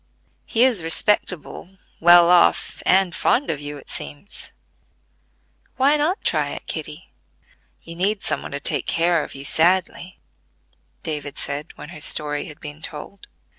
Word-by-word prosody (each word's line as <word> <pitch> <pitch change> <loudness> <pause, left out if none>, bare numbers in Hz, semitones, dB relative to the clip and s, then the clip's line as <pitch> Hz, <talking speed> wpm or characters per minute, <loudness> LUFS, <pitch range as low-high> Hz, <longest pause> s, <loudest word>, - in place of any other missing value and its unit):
He 230 - +2
is 250 -8 +2
respectable, 180 +1 0 0.2
well 175 +1 +6
off, 175 -1 +2
and 190 -2 +3
fond 275 - +1
of 150 - -5
you, 145 0 -7
it 140 - -15
seems. 145 +8 -8 1.3
Why 275 +3 +3
not 310 +6 -1
try - - 0
it, - - -10
Kitty? - - -7 0.7
You 165 - -10
need 195 +3 -1
some - - -1
one - - -8
to 140 - -5
take - - -1
care 170 -1 +1
of - - -10
you 135 +1 -9
sadly," 180 +3 0 0.8
David 150 -3 -5
said, 145 +1 -4
when 150 - -10
her 155 -4 -10
story 150 0 +5
had 155 -5 -11
been 150 0 -9
told. 160 +6 -6
170 Hz, 150 wpm, -21 LUFS, 150-195 Hz, 1.3 s, well